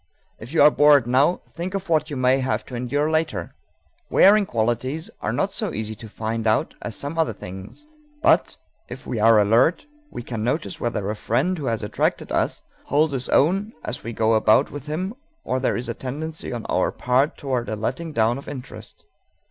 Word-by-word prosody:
If 115 +4 -9
you 160 -3 +4
are 150 - +8
bored 145 -4 +5
now, 135 +8 +2
think 180 +3 -5
of 195 -1 -4
what 155 -2 +1
you 145 - -4
may 130 +1 +3
have 130 0 -1
to - - -12
endure 145 +6 -1
later._ 160 0 -1 0.6
Wearing 205 +1 +5
qualities 120 +7 -1
are - - -1
not - - 0
so - - -2
easy 110 +1 -3
to 110 - -10
find 110 +1 -3
out 110 - +1
as 115 - -5
some 145 +4 -4
other 160 - +1
things; 95 - -10 0.4
but, - - +3 0.3
if - - -9
we 115 - -3
are 110 0 +6
alert, 115 - +3 0.2
we 120 - -7
can 115 -3 -4
notice 155 +6 -2
whether 105 -5 -2
a - - -4
friend 130 - 0
who 150 -5 -5
has 115 -2 -1
attracted 105 - -1
us - - -1 0.2
holds 150 +1 +2
his 130 -2 -1
own 195 +9 +2
as 125 - -5
we 115 - -5
go 110 0 +1
about 110 +4 +4
with 145 0 -8
him 180 +7 -3 0.3
or 130 - -1
there 130 - 0
is 120 - -4
a - - -2
tendency 155 +5 -5
on 120 -2 -5
our 90 - +1
part 130 +4 +1
toward 125 -5 -2
a 110 - -2
letting 130 +10 -3
down 115 -1 +1
of - - -13
interest. 130 -3 -10
130 Hz, 200 wpm, -23 LUFS, 115-155 Hz, 0.6 s, are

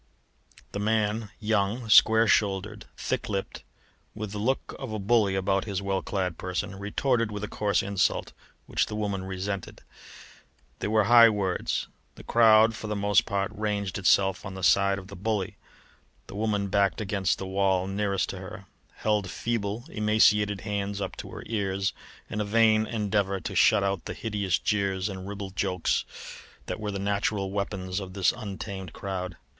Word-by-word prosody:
The 100 - -4
man 110 0 0
young, 110 +2 0
square 110 +1 +6
shouldered, 105 0 0
thick 125 -2 -2
lipped, 100 -2 -3 0.5
with 105 -2 -5
the 105 - -5
look 130 +6 -1
of 130 -4 -6
a 110 - -2
bully 105 -1 +2
about 95 0 +1
his 100 -4 -2
well 100 -1 -1
clad 90 -4 -2
person 95 +2 -3
retorted 115 +3 0
with 105 0 -5
a - - -2
coarse 100 -2 0
insult, 100 -2 0 0.3
which - - 0
the 105 - -5
woman 100 -3 -2
resented. 95 0 -5 1.0
There - - -2
were 110 0 +4
high 115 +1 +8
words; 100 -4 -1 0.3
the - - -12
crowd 110 -1 +5
for 110 - -6
the 105 - -2
most 100 0 +2
part 100 0 -1
ranged 105 -2 -2
itself 95 0 +3
on 95 - -7
the 95 - -7
side 100 +2 +4
of 95 - -8
the 100 - -10
bully. 100 0 -2 0.7
The - - -11
woman 105 -2 0
backed 100 +1 +2
against 100 -4 0
the 95 - -5
wall 95 -1 +1
nearest 100 0 -1
to 95 - -5
her, 95 +1 -9 0.3
held 105 -3 0
feeble, 115 +3 -2
emaciated 105 - +3
hands 100 -1 -3
up 100 - -4
to - - -7
her - - -8
ears 100 -3 -1 0.3
in 105 -1 -3
a - - +1
vain 110 +1 +3
endeavour 100 -3 0
to - - -5
shut 100 - +4
out 100 -2 -1
the - - -5
hideous 100 -5 -1
jeers 100 -2 0
and 95 -1 -7
ribald 100 -1 -6
jokes 95 -3 0 0.6
which - - -4
were 105 -1 -3
the 100 - -3
natural 100 0 -1
weapons 100 -2 -3
of 95 -2 -7
this 95 -2 +3
untamed 95 -3 -6
crowd. 90 -2 -5
100 Hz, 170 wpm, -27 LUFS, 95-105 Hz, 1.0 s, high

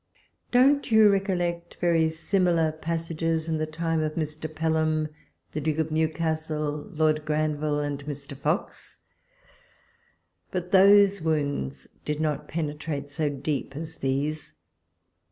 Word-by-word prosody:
Don't 270 +2 +4
you 220 -1 +7
recollect 175 -3 -1
very 165 -2 +3
similar 170 -1 +1
passages 165 0 -2
in 160 -1 -1
the 155 - -1
time 165 +1 -1
of 155 0 -2
Mr. 155 0 -4
Pelham, 155 -1 0 0.4
the 155 - -3
Duke 155 +1 -1
of 160 0 -1
Newcastle, 155 -2 -1
Lord 155 -3 +1
Granville, 150 -1 0
and 145 -1 -3
Mr. 140 -1 -6
Fox? 150 +6 -3 1.5
But 180 0 -4
those 200 +1 +6
woimds 145 - -1 0.2
did 150 0 -2
not 150 -2 -1
penetrate 150 -2 -4
so 150 0 0
deep 140 0 -3
as. 160 +2 -6
these 145 - -2
155 Hz, 120 wpm, -26 LUFS, 150-165 Hz, 1.5 s, you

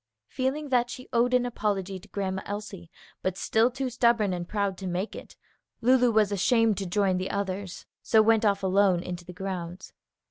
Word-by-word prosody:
Feeling 275 +3 -2
that 245 -2 +2
she 255 +1 -8
owed 240 +1 +3
an 250 0 +2
apology 200 -5 -2
to 195 - -17
Grandma 190 -1 -3
Elsie, 200 -4 -6 0.3
but 185 0 -2
still 220 +4 +2
too 255 0 -4
stubborn 235 -5 +2
and 175 -1 -5
proud 200 -2 -1
to 190 - -5
make 180 +4 -3
it, - - -10 0.4
Lulu 250 +1 +4
was 215 -2 +3
ashamed 220 +1 +2
to 195 - -3
join 195 0 +1
the 185 +1 -3
others, 195 -2 -4 0.2
so 220 - +3
went 225 0 +4
off 200 -2 +2
alone 190 -2 +3
into 180 -1 -6
the 180 - -9
grounds. 180 -1 -6
200 Hz, 185 wpm, -27 LUFS, 190-235 Hz, 0.4 s, Lulu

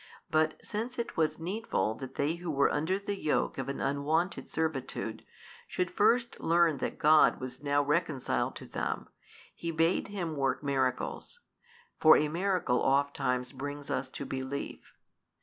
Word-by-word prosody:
But 155 0 +3
since 230 +4 -4
it 235 - -3
was 160 -1 +1
needful 165 - -1
that 130 +3 -8
they 150 +4 0
who 175 0 -6
were 140 -2 +3
under 160 +6 0
the 200 0 -3
yoke 150 - 0
of 135 0 -3
an 140 - -3
unwonted 155 +6 0
servitude, 160 -5 -3 0.4
should 180 -1 -1
first 235 +3 +2
learn 165 -3 +3
that - - -3
God 155 +1 +5
was 130 +1 -7
now 145 0 +2
reconciled 150 -2 0
to - - -8
them, - - -3 0.4
He 170 - -5
bade 165 +2 +2
him 180 -6 -3
work 135 0 0
miracles: 135 - -1 0.6
for 155 0 +8
a 150 - +1
miracle 175 -7 +1
|204 - - -1
oft 140 +1 +2
time 125 -2 0
brings 145 +1 -5
us 130 - -1
to 140 - -6
belief. 130 +1 -5
155 Hz, 160 wpm, -31 LUFS, 140-175 Hz, 0.6 s, for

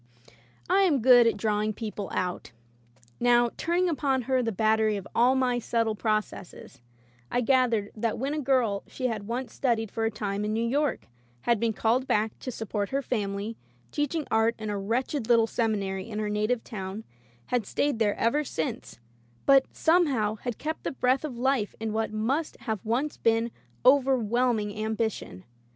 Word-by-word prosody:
I 395 - +4
am 335 -8 +3
good 245 -2 +7
at 230 - +1
drawing 215 0 0
people 210 -2 -5
out. 180 -8 -3 0.7
Now, 240 -1 +4
turning 350 +2 +1
upon 275 -5 0
her 260 +1 +1
the 230 -2 -1
battery 220 +1 +2
of 200 - -7
all 250 +3 +4
my 250 -2 +1
subtle 230 -1 0
processes, 215 - -3 0.5
I 245 - +1
gathered 240 -5 +2
that 225 0 -1
when 275 +4 -2
a 305 - -1
girl 250 -7 +1
she 255 - -5
had 215 -5 -2
once 240 0 -4
studied 225 -5 0
for 225 - -2
a 225 - +2
time 205 -2 -3
in 210 +1 -1
New 230 +1 0
York, 285 +3 0 0.4
had 235 -3 +2
been 230 0 +1
called 235 +4 +1
back 215 +1 0
to - - -6
support 210 -4 -3
her 275 +1 -1
family, 210 -2 -3 0.3
teach 295 +2 -1
ing 315 -3 -1
art 225 +1 +3
in 215 -1 -4
a 205 - -2
wretched 235 +4 -2
little 230 -1 +5
seminary 200 -4 -2
in 210 - -5
her 215 -1 -1
native 215 +3 0
town, 195 0 -6 0.5
had 235 -5 +1
stayed 285 -5 0
there 210 -2 +2
ever 285 +7 +1
since, 160 - -4 0.5
but 270 -1 +6
somehow 285 -11 +2
had 240 0 -5
kept 315 +1 -4
the - - -1
breath 255 +1 +1
of 275 -6 -5
life 255 -4 0
in 220 -1 -3
what 220 0 -1
must 255 +9 -1
have 220 -5 -3
once 255 +7 -1
been 230 +1 +1 0.3
overwhelming 250 -4 +3
ambi 220 +1 -1
tion. 90 - -10
230 Hz, 175 wpm, -27 LUFS, 215-255 Hz, 0.7 s, good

